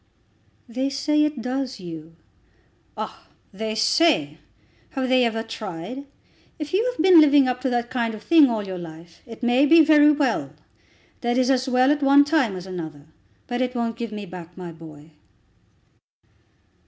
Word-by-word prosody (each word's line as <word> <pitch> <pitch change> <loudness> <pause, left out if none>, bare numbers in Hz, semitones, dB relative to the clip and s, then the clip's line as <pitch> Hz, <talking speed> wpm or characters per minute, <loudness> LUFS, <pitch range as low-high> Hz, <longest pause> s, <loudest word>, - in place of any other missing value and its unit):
"They 255 +3 -2
say 300 +2 +1
it 295 -6 -4
does, 260 +1 -3
Hugh." 165 -3 -10 0.8
"Ah! - - -7 0.3
they 220 +2 -4
say! 220 - +2 0.6
Have 260 -1 -2
they 255 -1 +4
ever 225 -1 -1
tried? 225 +4 -8 0.5
If 300 0 -7
you 400 +4 +2
have - - -16
been 360 -3 +7
living 285 -3 +5
up 250 0 -2
to 260 - -1
that 240 -1 -2
kind 235 -3 -2
of 215 - -12
thing 315 -5 +5
all 220 -3 -3
your 185 -2 -6
life, 165 0 -12
it 230 +1 -12
may 245 +4 +3
be 325 +1 +6
very 300 -1 +6
well; 245 - -1 0.7
that 240 0 -1
is 260 +1 +2
as 260 0 0
well 255 +2 +3
at 295 0 0
one 280 +1 +5
time 285 -10 +1
as 180 0 -8
another. 160 -6 -8 0.4
But 245 0 -3
it 250 0 -2
won't 230 -1 -2
give 235 -2 -6
me 210 -1 -7
back 175 -1 -11
my 180 -2 -8
boy." 160 -2 -14
245 Hz, 170 wpm, -23 LUFS, 185-275 Hz, 0.8 s, been